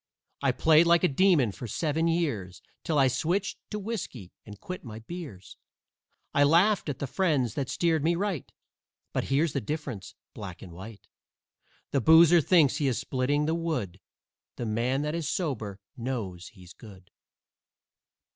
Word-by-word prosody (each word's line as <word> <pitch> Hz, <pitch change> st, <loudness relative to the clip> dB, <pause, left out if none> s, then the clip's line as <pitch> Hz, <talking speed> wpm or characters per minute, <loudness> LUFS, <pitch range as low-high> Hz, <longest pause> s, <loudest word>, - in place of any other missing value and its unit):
I -, -, +3 dB
played 160 Hz, +1 st, +4 dB
like 170 Hz, +1 st, +4 dB
a -, -, +6 dB
demon 150 Hz, -, +3 dB
for 120 Hz, -, -8 dB
seven 160 Hz, +6 st, 0 dB
years, 115 Hz, -, -2 dB, 0.2 s
'Till 160 Hz, -, 0 dB
I 135 Hz, -2 st, +5 dB
switched 170 Hz, +10 st, -1 dB
to 210 Hz, -, -4 dB
whiskey 190 Hz, -, -6 dB, 0.2 s
and 105 Hz, -1 st, -10 dB
quit 185 Hz, 0 st, -7 dB
my 110 Hz, -5 st, -8 dB
beers. 115 Hz, -, -9 dB, 0.8 s
I 140 Hz, -, +4 dB
laughed 170 Hz, +5 st, +3 dB
at 140 Hz, -, -3 dB
the 140 Hz, -, -3 dB
friends 140 Hz, -, 0 dB
that 135 Hz, -3 st, -3 dB
steered 165 Hz, -4 st, +1 dB
me 170 Hz, +2 st, +2 dB
right, 190 Hz, -5 st, -3 dB, 0.6 s
But -, -, -1 dB
here's 145 Hz, +3 st, +1 dB
the -, -, -1 dB
difference, 130 Hz, -, -5 dB, 0.2 s
black 95 Hz, -4 st, -8 dB
and 90 Hz, -, -10 dB
white: 100 Hz, +4 st, -11 dB, 0.8 s
The 140 Hz, -, +1 dB
boozer 165 Hz, +4 st, +7 dB
THINKS 150 Hz, -4 st, +4 dB
he 145 Hz, -3 st, 0 dB
is 130 Hz, -, 0 dB
splitting 135 Hz, +3 st, 0 dB
the 160 Hz, -, 0 dB
wood, 155 Hz, -, -3 dB, 0.6 s
The 120 Hz, -, -4 dB
man 120 Hz, +6 st, 0 dB
that 150 Hz, 0 st, -2 dB
is 170 Hz, -2 st, -2 dB
sober 110 Hz, -, -3 dB, 0.2 s
KNOWS 115 Hz, -9 st, -5 dB
he's 90 Hz, -4 st, -15 dB
good." 95 Hz, -5 st, -15 dB
140 Hz, 160 wpm, -28 LUFS, 110-165 Hz, 0.8 s, boozer